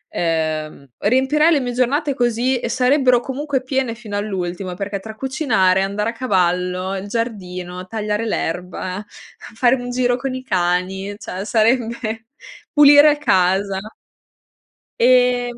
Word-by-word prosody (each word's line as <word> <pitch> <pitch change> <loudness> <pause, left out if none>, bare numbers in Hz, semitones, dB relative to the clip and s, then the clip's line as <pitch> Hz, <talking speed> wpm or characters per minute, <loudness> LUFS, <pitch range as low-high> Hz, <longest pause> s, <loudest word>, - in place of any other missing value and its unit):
Uhm, 155 -3 -2
riempirei 265 +8 +3
le 300 - +3
mie 245 -2 -3
giornate 275 +4 0
così 245 +1 0
e - - -4
sarebbero 255 -1 +3
comunque 270 +1 -3
piene 260 -3 -1
fino 220 -3 -8
all'ultimo 185 -3 -3
perché 200 +1 -4
tra 220 +1 -9
cucinare, 225 -8 +1
andare 210 +3 -1
a - - -14
cavallo, 185 -4 0
il 195 +1 -5
giardino, 185 -5 -4
tagliare 215 0 -2
l'erba, 180 +1 -3 0.5
fare 245 +2 +3
un 245 -1 -6
giro 245 0 +1
con 260 +1 -4
i 260 - -6
cani, 190 -1 -1
cioè 195 -2 -6
sarebbe 225 0 0 0.5
pulire 290 0 +7
casa. 190 -6 +1 1.2
Ehm, 245 0 +3
225 Hz, 125 wpm, -19 LUFS, 185-255 Hz, 1.2 s, pulire